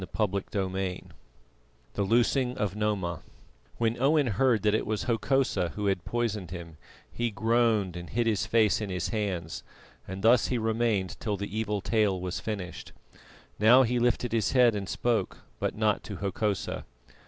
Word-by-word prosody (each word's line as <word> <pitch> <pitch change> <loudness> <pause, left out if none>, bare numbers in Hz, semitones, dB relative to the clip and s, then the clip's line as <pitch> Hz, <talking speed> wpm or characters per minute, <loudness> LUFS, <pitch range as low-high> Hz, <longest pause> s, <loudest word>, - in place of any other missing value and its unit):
CHAPTER 100 -2 +1
XVII 95 -2 -2 0.9
THE - - -2
LOOSING 125 +4 +2
OF 105 -3 -1
NOMA 100 -6 -1 0.6
When 115 +1 0
Owen 145 +2 +4
heard 120 0 +2
that 105 -1 +3
it 110 - 0
was 105 -1 -1
Hokosa 115 -7 0
who 105 - -3
had 95 -3 0
poisoned 110 -7 -2
him, 85 -2 -8 0.3
he 120 0 -1
groaned 110 -3 +1
and 85 -1 -7
hid 120 +1 0
his 100 -5 0
face 110 0 +3
in 105 - -3
his 90 -2 -2
hands, 95 -7 -3 0.5
and 95 +1 -6
thus 115 +1 +5
he 125 - 0
remained 110 -5 0
till 105 -3 -2
the 100 +1 -5
evil 105 -2 -1
tale 105 -3 +1
was 90 0 -3
finished. 100 -5 -6 0.7
Now 120 +5 +7
he 120 0 0
lifted 120 0 +1
his 110 0 +1
head 125 -3 +5
and 100 -2 -4
spoke, 120 -2 -1 0.2
but - - -1
not 110 -1 +1
to 105 - -6
Hokosa. 100 +1 -2
105 Hz, 165 wpm, -28 LUFS, 95-115 Hz, 0.9 s, Now